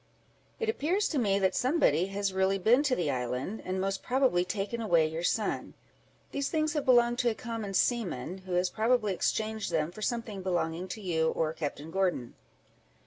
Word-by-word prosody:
"It 455 - -1
appears 390 -1 +1
to 295 - 0
me 200 -4 +2
that 190 -1 +2
somebody 250 - +2
has 195 0 -2
really 190 +1 +2
been 225 +8 +4
to 290 -4 +1
the 165 - 0
island, 125 - -3
and 185 +1 -2
most 195 0 -1
probably 255 -9 +2
taken 205 +5 -3
away 170 -7 +3
your 160 +1 -3
son. 210 +4 -1 0.6
These 280 0 -1
things 310 -2 0
have 295 -3 -1
belonged 240 -2 +4
to 245 - +3
a 225 - -2
common 225 -4 -5
seaman, 185 - 0
who 185 -1 -7
has 180 +1 +1
probably 220 -2 +2
exchanged 220 +2 -1
them 160 0 0
for 215 - -11
something 225 -3 -2
belonging 175 -1 -1
to 215 +4 -6
you 160 -4 +1
or 155 -1 -1
Captain 155 0 -5
Gordon." 180 -10 0
195 Hz, 185 wpm, -30 LUFS, 175-240 Hz, 0.6 s, been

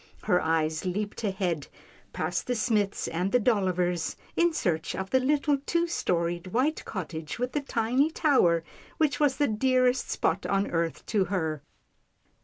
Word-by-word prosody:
Her 180 - +2
eyes 160 -1 0
leaped 205 +5 -3
ahead, 185 -7 -1 0.4
past 170 +2 -2
the 250 - 0
Smiths' 215 -3 0
and 180 +4 -1
the 250 - +4
Dollivers', 180 -7 +1 0.2
in 345 0 +3
search 170 - -1
of 190 0 -5
the 260 - +4
little, 285 +1 +2
two 340 0 +2
storied 175 - -1
white 255 +11 0
cottage 160 -5 -5
with 250 +1 -2
the 295 - -1
tiny 255 +3 +1
tower 255 - +3 0.3
which 290 -5 +1
was 290 -3 +2
the 290 - +2
dearest 255 +3 +2
spot 180 +4 0
on 195 0 +1
earth 165 -1 -1
to 205 -4 +1
her. 160 -6 -2
200 Hz, 155 wpm, -28 LUFS, 175-255 Hz, 0.4 s, the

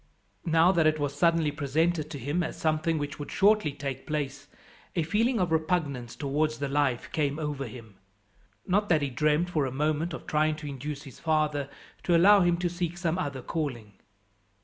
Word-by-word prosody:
Now 165 +2 +5
that 165 -4 +3
it 155 0 +2
was 145 -2 -2
suddenly 165 0 +2
presented 155 +2 0
to 155 - -6
him 145 +7 -1
as 160 - -4
something 160 +1 +1
which 145 -1 -4
would 145 - -6
shortly 205 -5 +3
take 140 -2 -6
place, 145 -2 -3 0.5
a 170 - +1
feeling 225 +9 +1
of 180 -3 0
repugnance 155 -7 -1
towards 150 +2 -1
the 140 -1 -2
life 135 -3 0
came 145 -2 0
over 145 -4 -3
him. 110 -3 -12 0.7
Not 205 +3 +1
that 155 -4 +3
he 140 - -2
dreamt 150 +6 +1
for 150 -5 +1
a - - -4
moment 155 +4 -1
of - - -10
trying 155 0 +1
to 150 -1 -8
induce 145 +1 -5
his 135 -5 -12
father 150 -3 0 0.3
to 175 -2 +3
allow 200 +4 +7
him 175 -1 +3
to 175 0 0
seek 175 0 -3
some 175 0 -1
other 140 -7 -3
calling. 125 -11 -4
155 Hz, 190 wpm, -28 LUFS, 140-170 Hz, 0.7 s, allow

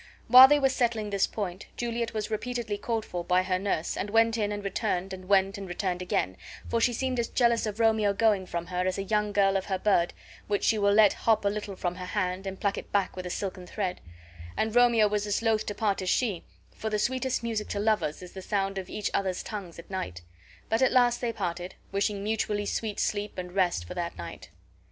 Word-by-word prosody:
While 255 +3 +11
they 295 +2 +5
were 270 - +4
settling 235 -5 0
this 200 -1 +2
point 190 -3 -5
Juliet 235 -1 -2
was 215 -1 -4
repeatedly 230 -1 -2
called 225 0 -2
for 175 -1 -4
by 180 +1 +2
her 185 -1 0
nurse, 190 -4 -1
and 205 - -3
went 225 +1 +3
in 210 -2 0
and 205 0 -4
returned, 195 -2 -2
and 185 -1 -9
went 195 0 +3
and 195 - -6
returned 180 0 -2
again, 95 - -1 0.3
for 230 - 0
she 245 - +4
seemed 255 +1 -1
as 235 - 0
jealous 235 -2 +2
of 210 +1 -5
Romeo 220 -2 +3
going 200 -2 +2
from 170 -1 -3
her 180 +1 -1
as 185 - -1
a 195 - -2
young 210 +1 0
girl 195 -1 +3
of 190 - 0
her 190 -2 -1
bird, 185 -4 +2 0.3
which 205 -1 0
she 220 - +3
will 200 0 +3
let 210 -1 +6
hop 220 -2 +1
a - - +4
little 205 -1 -4
from 180 -1 -2
her 180 - -6
hand 185 -1 -2
and 190 0 -5
pluck 200 -1 0
it - - -12
back 200 -2 0
with 185 -1 -5
a - - -5
silken 185 -1 -4
thread; 185 -2 -3 0.6
and 220 +1 0
Romeo 235 -3 +5
was 210 0 -1
as 205 +2 0
loath 220 -2 +1
to 205 - -3
part 200 -2 0
as 185 - -2
she, 210 -7 0 0.3
for 220 - -3
the 215 - 0
sweetest 255 +3 -1
music 225 -2 -2
to 200 - -3
lovers 205 -7 0
is 180 - -10
the 190 - -8
sound 195 0 -1
of 185 - -8
each 210 - -3
other's 190 -2 -1
tongues 195 -6 -7
at 170 - -12
night. 90 - -4 0.4
But 225 +2 +1
at 260 - +4
last 245 -2 +3
they 240 -2 0
parted, 180 -4 -4 0.2
wishing 200 0 -1
mutually 210 -1 -1
sweet 215 0 -2
sleep 205 0 -2
and 180 -1 -5
rest 180 - +1
for - - -7
that 170 -1 -4
night. 85 -1 -8
205 Hz, 235 wpm, -28 LUFS, 185-220 Hz, 0.6 s, While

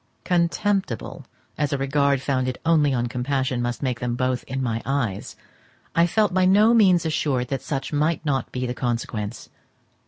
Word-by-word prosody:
Contemptible 180 - -1 0.3
as 145 -2 0
a 140 - 0
regard 140 0 +1
founded 130 -2 -1
only 155 -3 +4
on 120 -2 0
compassion 130 +1 -1
must 120 +3 -3
make 125 -3 -1
them 120 -1 -2
both 130 0 -1
in 135 - -4
my 115 -3 -1
eyes, 120 -7 -2 0.6
I 170 +1 +4
felt 210 +1 +1
by 185 0 +3
no 210 +5 +5
means 185 -7 +4
assured 135 -5 0
that 135 - -2
such 135 +1 -4
might 155 +2 0
not 135 -4 -1
be 125 0 -3
the 125 - -2
consequence. 115 -3 -4
135 Hz, 165 wpm, -23 LUFS, 125-165 Hz, 0.6 s, no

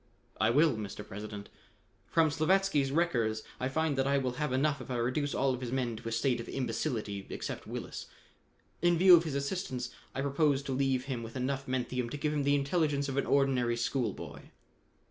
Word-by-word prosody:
"I - - +4
will, 145 +1 +4
Mr. 105 0 -6
President. 105 0 -7 0.6
From 160 -2 +3
Slavatsky's 155 -2 +2
records 120 -9 +1 0.2
I 130 - -1
find 160 +1 0
that 135 - +2
I 140 0 +3
will 130 -2 0
have 150 -3 0
enough 140 +1 +1
if - - -9
I 125 - -2
reduce 130 +5 0
all 135 -1 +2
of 125 - -5
his 120 -2 -4
men 125 -3 -1
to 115 - -5
a - - -7
state 120 +2 +1
of - - -9
imbecility 115 -6 -2
except - - -5
Willis. - - -6 0.7
In 175 0 +4
view 180 +1 +9
of 170 0 +3
his 150 -4 -3
assistance, 140 -5 -3 0.2
I 135 - -1
propose 140 0 +2
to 140 - -4
leave 130 -1 +1
him 130 -4 -3
with 115 0 -8
enough 135 +1 -2
menthium 125 -1 -1
to 145 - -5
give 150 +1 -1
him 150 - 0
the 140 0 +4
intelligence 140 -1 +1
of 135 - -3
an 140 - +1
ordinary 130 -4 +2
schoolboy." 120 +1 -3
135 Hz, 200 wpm, -31 LUFS, 120-145 Hz, 0.7 s, view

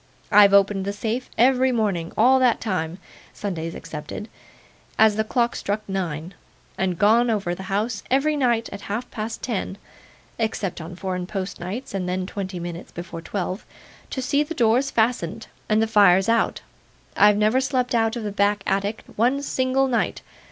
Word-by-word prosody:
I've 205 -1 +7
opened 200 -1 +4
the 200 - -2
safe 225 +4 -3
every 255 +2 +4
morning 200 -8 -1
all 265 +1 +5
that 250 -3 +3
time 180 -5 -2 0.4
(Sundays 165 -5 -4
excepted) 155 +8 -7 0.7
as 220 -1 +5
the 220 - +1
clock 235 +2 0
struck 210 +1 -3
nine, 175 -3 -3 0.4
and 185 -2 -1
gone 230 +5 +4
over 200 -6 0
the 180 - -7
house 210 +2 -1
every 280 +4 +2
night 240 -5 +1
at 200 - -7
half 220 +5 -3
past 225 0 -5
ten 205 -4 -3 0.6
(except 215 -6 -2
on 170 +3 -8
Foreign 180 -1 -4
Post 195 0 -4
nights, 195 +9 -6
and 185 -2 -2
then 185 0 -1
twenty 190 -1 -5
minutes 175 +1 -7
before 170 -1 -7
twelve) 185 +2 -4 0.5
to 260 - -3
see 280 +3 +2
the 315 +3 -3
doors 240 +3 +3
fastened, 220 -3 0 0.2
and 215 +1 +3
the - - +3
fires 200 -4 +5
out. 230 0 +1 0.5
I've 210 0 +5
never 215 +5 +3
slept 255 -2 0
out 225 0 +2
of 235 - -4
the 210 - -3
back 200 0 +1
attic 200 +3 -1
one 255 +6 +2
single 265 0 +1
night. 245 -3 -1
210 Hz, 170 wpm, -23 LUFS, 190-235 Hz, 0.7 s, I've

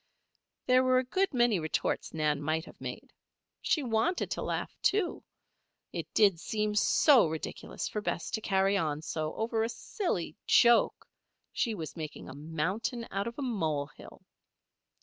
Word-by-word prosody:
There 255 0 +5
were 255 0 +4
a 255 - +3
good 375 +10 0
many 240 - +3
retorts 155 -1 -1
Nan 150 -2 0
might 160 +3 -1
have - - -15
made. - - -7 0.5
She 305 - +1
wanted 245 +10 0
to - - -2
laugh, - - -3
too. 395 -3 +1 0.7
It - - -5
did 200 -6 +5
seem 210 +3 -1
so 240 - +5
ridiculous 160 0 -5
for 210 - -3
Bess 185 - -3
to 220 - -2
carry 195 -1 +2
on 155 -5 -1
so 155 -1 -3
over 225 0 -1
a 225 - 0
silly 235 - -3
joke. 235 0 +5 0.5
She 230 -3 0
was 160 -5 -6
making 155 -3 -7
a - - -8
mountain 170 - -3
out 195 +2 -1
of 235 - -6
a 285 - -3
molehill. 155 - -3
210 Hz, 155 wpm, -30 LUFS, 160-240 Hz, 0.7 s, There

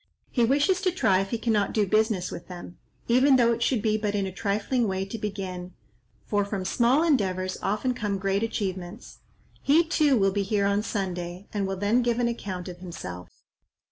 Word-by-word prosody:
He 240 - +2
wishes 290 +10 +2
to 370 - +2
try 195 - +2
if 195 0 -2
he 235 - -1
cannot 220 -3 0
do 210 -2 +2
business 215 -2 +1
with - - -8
them, 175 -1 -10 0.3
even 260 +3 +5
though 235 -2 +4
it 230 0 -2
should 235 -3 +1
be 215 -1 +1
but 210 -1 -1
in 200 -1 0
a 190 - -4
trifling 215 +5 0
way 190 0 -1
to 200 +4 -6
begin; 185 -3 -5 0.5
for 205 -1 +1
from 200 -2 -4
small 245 - +3
endeavours 185 - +1
often 215 +6 0
come 210 -5 -2
great 195 +1 0
achievements. 195 -2 -4 0.4
He, 310 +5 +4
too, 305 -5 +3
will 195 -2 +3
be 200 +1 0
here 200 0 0
on 200 +1 +2
Sunday, 180 -3 -4
and 200 -2 -1
will 195 0 -3
then 205 +6 +2
give 240 -1 0
an 245 -1 +1
account 195 -6 -4
of 180 -1 -8
himself." 90 - -8
205 Hz, 200 wpm, -26 LUFS, 190-235 Hz, 0.5 s, even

